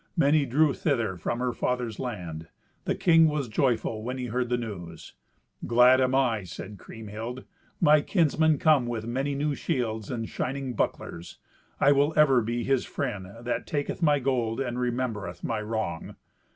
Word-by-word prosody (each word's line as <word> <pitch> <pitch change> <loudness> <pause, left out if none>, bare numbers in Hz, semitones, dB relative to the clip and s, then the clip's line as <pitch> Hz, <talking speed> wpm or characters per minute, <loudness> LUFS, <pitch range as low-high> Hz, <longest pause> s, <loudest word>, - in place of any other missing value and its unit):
Many 145 -2 +3
drew 145 +3 +3
thither 120 -11 0
from 90 +7 -3
her 125 0 -1
father's 125 -4 -2
land. 85 -10 -5 0.4
The - - 0
king 165 -2 +5
was 150 -4 -1
joyful 115 -1 0
when 125 +4 -4
he 125 - -3
heard 125 +1 -2
the 125 - +1
news. 90 -8 -7 0.5
"Glad 125 +2 +6
am 130 0 +2
I," 120 -6 +2
said 95 +3 -9
Kriemhild, 110 +3 -7 0.4
"my 150 -2 +5
kinsmen 160 -3 +2
come 150 -7 +3
with 115 -2 -3
many 135 +4 -2
new 145 +1 0
shields 110 -6 -2
and 115 -3 -3
shining 135 -1 -3
bucklers. 85 -5 -3 0.4
I 140 - +5
will 145 +2 +3
ever 135 -5 +5
be 120 +2 -2
his 135 0 +1
friend 110 -9 -4
that 120 0 -3
taketh 145 +3 -3
my 150 -3 +4
gold 125 -4 -1
and 125 -2 -2
remembereth 120 -4 -3
my 110 -2 -2
wrong." 105 -6 -4
125 Hz, 165 wpm, -27 LUFS, 110-140 Hz, 0.5 s, Glad